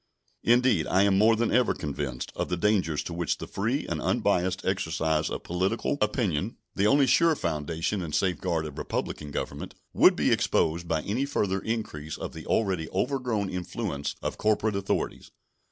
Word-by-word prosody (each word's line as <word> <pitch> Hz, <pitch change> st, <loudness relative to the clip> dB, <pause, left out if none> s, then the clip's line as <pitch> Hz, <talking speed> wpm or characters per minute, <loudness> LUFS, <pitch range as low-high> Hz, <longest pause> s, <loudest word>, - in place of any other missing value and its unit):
Indeed, 120 Hz, -8 st, +3 dB
I 95 Hz, +2 st, +4 dB
am 100 Hz, -1 st, +3 dB
more 110 Hz, +3 st, +5 dB
than 115 Hz, +1 st, 0 dB
ever 125 Hz, 0 st, +3 dB
convinced 70 Hz, -4 st, -4 dB
of -, -, -2 dB
the 90 Hz, -, -1 dB
dangers 90 Hz, -5 st, +1 dB
to 85 Hz, -, -6 dB
which 85 Hz, -1 st, -1 dB
the -, -, -6 dB
free -, -, -1 dB
and -, -, -3 dB
unbiased 95 Hz, +1 st, +1 dB
exercise 80 Hz, -4 st, 0 dB
of -, -, -5 dB
political 95 Hz, +10 st, -1 dB
opinion 105 Hz, -, 0 dB, 0.2 s
the 100 Hz, -, +2 dB
only 140 Hz, +3 st, +5 dB
sure 165 Hz, +5 st, +4 dB
foundation 80 Hz, -, -2 dB
and 80 Hz, -4 st, -3 dB
safeguard 90 Hz, -3 st, 0 dB
of 75 Hz, -2 st, -7 dB
republican 75 Hz, -, -3 dB
government -, -, -5 dB, 0.2 s
would -, -, +6 dB
be -, -, +2 dB
exposed 85 Hz, +2 st, +1 dB
by 80 Hz, -2 st, 0 dB
any 120 Hz, +7 st, -1 dB
further 100 Hz, -9 st, 0 dB
increase 85 Hz, -9 st, -4 dB
of -, -, -6 dB
the -, -, -9 dB
already 95 Hz, -7 st, 0 dB
overgrown 120 Hz, -1 st, -1 dB
influence 90 Hz, -4 st, -3 dB
of -, -, -3 dB
corporate 110 Hz, 0 st, +1 dB
authorities. 100 Hz, 0 st, -2 dB
95 Hz, 170 wpm, -27 LUFS, 80-110 Hz, 0.2 s, would